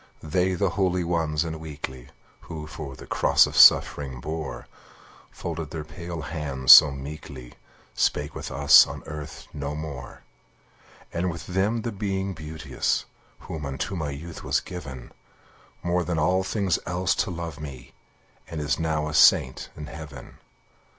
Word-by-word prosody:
They, 90 Hz, +4 st, +1 dB
the 95 Hz, 0 st, 0 dB
holy 90 Hz, -1 st, +1 dB
ones 80 Hz, -2 st, 0 dB
and 80 Hz, -1 st, -5 dB
weakly, 70 Hz, -5 st, -8 dB, 0.4 s
Who 75 Hz, -2 st, -6 dB, 0.3 s
the -, -, -11 dB
cross -, -, +4 dB
of -, -, -7 dB
suffering 65 Hz, -3 st, +6 dB
bore, 80 Hz, +2 st, -5 dB, 0.6 s
Folded 80 Hz, -3 st, -5 dB
their 80 Hz, -1 st, -5 dB
pale 85 Hz, +2 st, -7 dB
hands 75 Hz, -4 st, +1 dB
so -, -, +11 dB
meekly, 70 Hz, -2 st, -8 dB, 0.4 s
Spake -, -, 0 dB
with -, -, -6 dB
us 70 Hz, +1 st, +7 dB
on -, -, -8 dB
earth 75 Hz, -1 st, -8 dB
no 70 Hz, 0 st, -4 dB
more! 70 Hz, -5 st, -7 dB, 0.9 s
And 90 Hz, +2 st, 0 dB
with 85 Hz, -1 st, -6 dB
them 100 Hz, +5 st, 0 dB
the 115 Hz, -, -2 dB
Being 95 Hz, -1 st, -2 dB
Beauteous, 80 Hz, -1 st, -2 dB, 0.4 s
Who 80 Hz, -2 st, -7 dB
unto 70 Hz, +8 st, -4 dB
my 80 Hz, -4 st, -3 dB
youth 80 Hz, +4 st, -8 dB
was -, -, +1 dB
given, 70 Hz, -8 st, -9 dB, 0.7 s
More 90 Hz, +1 st, +1 dB
than 85 Hz, 0 st, -2 dB
all 90 Hz, +4 st, +2 dB
things 95 Hz, -3 st, 0 dB
else 90 Hz, +1 st, +1 dB
to -, -, -2 dB
love 85 Hz, -3 st, -6 dB
me, 65 Hz, -5 st, -9 dB, 0.5 s
And 80 Hz, -, -6 dB
is 75 Hz, -3 st, -1 dB
now 80 Hz, -2 st, -1 dB
a 75 Hz, -, -5 dB
saint 65 Hz, -3 st, +4 dB
in 75 Hz, -, -6 dB
heaven. 75 Hz, -3 st, -10 dB
80 Hz, 150 wpm, -25 LUFS, 70-90 Hz, 0.9 s, so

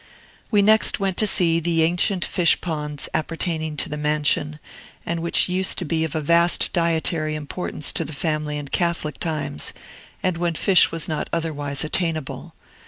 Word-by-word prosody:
We 205 Hz, -2 st, +3 dB
next 220 Hz, +1 st, +5 dB
went 195 Hz, -2 st, -1 dB
to 215 Hz, -, +3 dB
see 170 Hz, -4 st, +3 dB
the 165 Hz, -1 st, +1 dB
ancient 175 Hz, +3 st, +1 dB
fish 175 Hz, -3 st, +3 dB
ponds 150 Hz, -4 st, -4 dB
appertaining 160 Hz, -1 st, -2 dB
to -, -, +1 dB
the 150 Hz, -, -5 dB
mansion, 150 Hz, 0 st, 0 dB, 0.5 s
and 170 Hz, 0 st, -2 dB
which 170 Hz, +1 st, +3 dB
used 185 Hz, +1 st, +1 dB
to 180 Hz, -, -2 dB
be 160 Hz, +1 st, -1 dB
of 160 Hz, -, -3 dB
vast 170 Hz, +3 st, +2 dB
dietary 160 Hz, -2 st, +1 dB
importance 150 Hz, 0 st, -4 dB
to -, -, 0 dB
the 155 Hz, -, -8 dB
family 150 Hz, 0 st, -2 dB
in 145 Hz, -1 st, -7 dB
Catholic 170 Hz, -2 st, -2 dB
times, 155 Hz, -, -3 dB, 0.5 s
and 185 Hz, -2 st, 0 dB
when 170 Hz, -1 st, -1 dB
fish 185 Hz, +2 st, +5 dB
was 165 Hz, -1 st, 0 dB
not 155 Hz, -2 st, -3 dB
otherwise 145 Hz, -4 st, -2 dB
attainable. 160 Hz, -2 st, -3 dB
165 Hz, 165 wpm, -22 LUFS, 150-175 Hz, 0.5 s, next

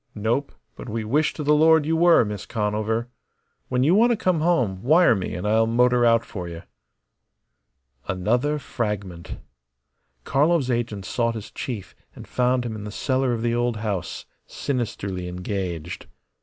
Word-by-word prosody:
"Nope. 115 Hz, +7 st, -1 dB, 0.2 s
But -, -, -9 dB
we 110 Hz, +1 st, -3 dB
wish 145 Hz, +8 st, +1 dB
to 150 Hz, -, -4 dB
the 150 Hz, +1 st, +3 dB
Lord 160 Hz, 0 st, +5 dB
you 160 Hz, +2 st, +1 dB
were, 170 Hz, -6 st, +5 dB
Miss 105 Hz, -2 st, -6 dB
Conover. 110 Hz, +2 st, -1 dB, 0.6 s
When 125 Hz, 0 st, +1 dB
you 155 Hz, +6 st, +4 dB
want 230 Hz, +5 st, +5 dB
to 235 Hz, -, +2 dB
come 185 Hz, -4 st, +1 dB
home, 125 Hz, -, +1 dB
wire 160 Hz, -, +5 dB
me 95 Hz, -4 st, -3 dB
and 90 Hz, +3 st, -3 dB
I'll 110 Hz, +1 st, +3 dB
motor 125 Hz, +1 st, +3 dB
out 115 Hz, -1 st, +4 dB
for 90 Hz, -4 st, -6 dB
you." 85 Hz, 0 st, -8 dB, 1.4 s
Another 120 Hz, +11 st, 0 dB
fragment. 100 Hz, -, -4 dB, 0.9 s
Karlov's 145 Hz, -, +2 dB
agent 115 Hz, -5 st, -2 dB
sought 115 Hz, +2 st, -1 dB
his 110 Hz, -2 st, -7 dB
chief 115 Hz, -7 st, -6 dB, 0.2 s
and -, -, -11 dB
found 125 Hz, 0 st, +1 dB
him 115 Hz, -2 st, -4 dB
in 105 Hz, -, -7 dB
the 105 Hz, -, -6 dB
cellar 130 Hz, +3 st, 0 dB
of 115 Hz, -1 st, -2 dB
the 120 Hz, 0 st, +1 dB
old 120 Hz, -1 st, 0 dB
house, 105 Hz, -5 st, -4 dB, 0.2 s
sinisterly 100 Hz, -8 st, -3 dB
engaged. 90 Hz, -2 st, -5 dB
115 Hz, 160 wpm, -24 LUFS, 105-135 Hz, 1.4 s, Lord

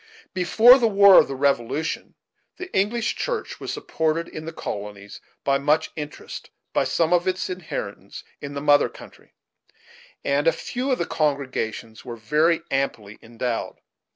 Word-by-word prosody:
Before 220 Hz, +8 st, +6 dB
the 235 Hz, -, +3 dB
war 200 Hz, -2 st, +8 dB
of -, -, +3 dB
the 135 Hz, -, -5 dB
Revolution, 140 Hz, +2 st, -1 dB, 0.4 s
the 370 Hz, 0 st, -8 dB
English 220 Hz, +4 st, +1 dB
Church 485 Hz, -3 st, -4 dB
was -, -, -5 dB
supported 160 Hz, +1 st, -1 dB
in 155 Hz, -, -8 dB
the 165 Hz, -, -5 dB
colonies, 100 Hz, -7 st, -7 dB, 0.2 s
with 140 Hz, -1 st, +2 dB
much 150 Hz, +2 st, +1 dB
interest, 150 Hz, -1 st, -8 dB, 0.2 s
by -, -, +2 dB
some 165 Hz, +1 st, +1 dB
of 175 Hz, 0 st, +2 dB
its 185 Hz, 0 st, -1 dB
adherents 180 Hz, -3 st, -6 dB, 0.2 s
in 145 Hz, 0 st, -7 dB
the 140 Hz, -, -3 dB
mother 145 Hz, 0 st, +4 dB
country, -, -, -16 dB, 0.9 s
and 145 Hz, +3 st, +1 dB
a -, -, +7 dB
few 255 Hz, +9 st, -4 dB
of 255 Hz, -, +2 dB
the 170 Hz, -, -1 dB
congregations 130 Hz, -8 st, -2 dB
were 120 Hz, -, -7 dB
very 155 Hz, +9 st, +2 dB
amply 110 Hz, -6 st, -2 dB
endowed. 115 Hz, +1 st, -4 dB
155 Hz, 155 wpm, -23 LUFS, 135-185 Hz, 0.9 s, war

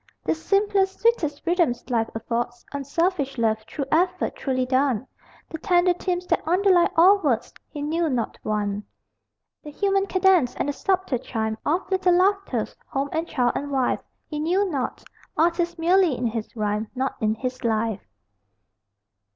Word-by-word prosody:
The -, -, +2 dB
simplest, 390 Hz, +3 st, +1 dB
sweetest 340 Hz, -12 st, +1 dB
rhythms 335 Hz, -9 st, +1 dB
life 225 Hz, -2 st, +1 dB
affords 235 Hz, +2 st, -3 dB
Unselfish 285 Hz, +1 st, -1 dB
love, 220 Hz, -1 st, +1 dB
true 280 Hz, -, -4 dB
effort 360 Hz, +3 st, +1 dB
truly 255 Hz, -2 st, -1 dB
done, 260 Hz, -2 st, +1 dB, 0.4 s
The 320 Hz, -, -7 dB
tender 360 Hz, -1 st, +3 dB
themes 360 Hz, 0 st, -2 dB
that -, -, +1 dB
underlie 360 Hz, 0 st, +4 dB
all 380 Hz, +5 st, +6 dB
words 255 Hz, -, -1 dB, 0.2 s
He 290 Hz, -, -6 dB
knew 325 Hz, +2 st, 0 dB
not 245 Hz, -4 st, -2 dB
one. 210 Hz, -1 st, -2 dB, 0.8 s
The 300 Hz, -, -9 dB
human 390 Hz, +5 st, +1 dB
cadence 370 Hz, -10 st, +3 dB
and -, -, -2 dB
the -, -, -1 dB
subtle 375 Hz, -6 st, 0 dB
chime 220 Hz, -2 st, -3 dB
Of 345 Hz, +6 st, 0 dB
little 370 Hz, -2 st, +3 dB
laughters, 395 Hz, +2 st, +1 dB
home 275 Hz, 0 st, -2 dB
and 325 Hz, +1 st, -2 dB
child 245 Hz, -6 st, +1 dB
and 285 Hz, -, -3 dB
wife, 265 Hz, -3 st, 0 dB, 0.3 s
He 300 Hz, -, -5 dB
knew 365 Hz, +6 st, +1 dB
not. 270 Hz, -4 st, -3 dB, 0.3 s
Artist 340 Hz, +2 st, +1 dB
merely 340 Hz, -3 st, +3 dB
in 245 Hz, -, -2 dB
his 225 Hz, 0 st, -3 dB
rhyme, 210 Hz, 0 st, -1 dB
Not 265 Hz, +1 st, -1 dB
in 215 Hz, 0 st, +1 dB
his 255 Hz, +3 st, -5 dB
life. 220 Hz, -2 st, 0 dB
300 Hz, 155 wpm, -24 LUFS, 245-360 Hz, 0.8 s, all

